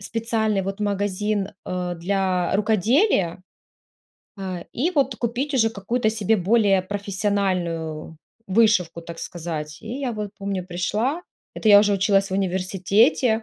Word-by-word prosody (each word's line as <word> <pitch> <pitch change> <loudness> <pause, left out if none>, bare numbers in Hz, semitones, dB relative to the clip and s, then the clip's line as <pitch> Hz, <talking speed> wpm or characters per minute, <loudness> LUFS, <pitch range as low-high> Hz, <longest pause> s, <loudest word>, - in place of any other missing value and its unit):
специальный 220 -1 -1
вот 195 +2 -5
магазин, 205 0 -1 0.2
э, 180 -1 -3
для 185 0 0
рукоделия, 210 - +2 1.0
а, 185 -2 -5
и 315 +9 0
вот 275 -6 +1
купить 245 +5 -2
уже 225 -3 +4
какую-то 220 +2 -1
себе 220 0 +1
более 200 0 +3
профессиональную 185 -5 -2 0.3
вышивку, 190 -5 +3
так 165 0 -9
сказать. 155 -3 -5
И 230 +5 -5
я 255 -4 -2
вот, 210 -2 -4
помню, 195 -2 -3
пришла, 210 - -1 0.4
это 220 - 0
я 205 -1 +9
уже 205 -1 +2
училась 195 0 +2
в - - -2
университете, 195 - +2
200 Hz, 130 wpm, -23 LUFS, 185-220 Hz, 1.0 s, я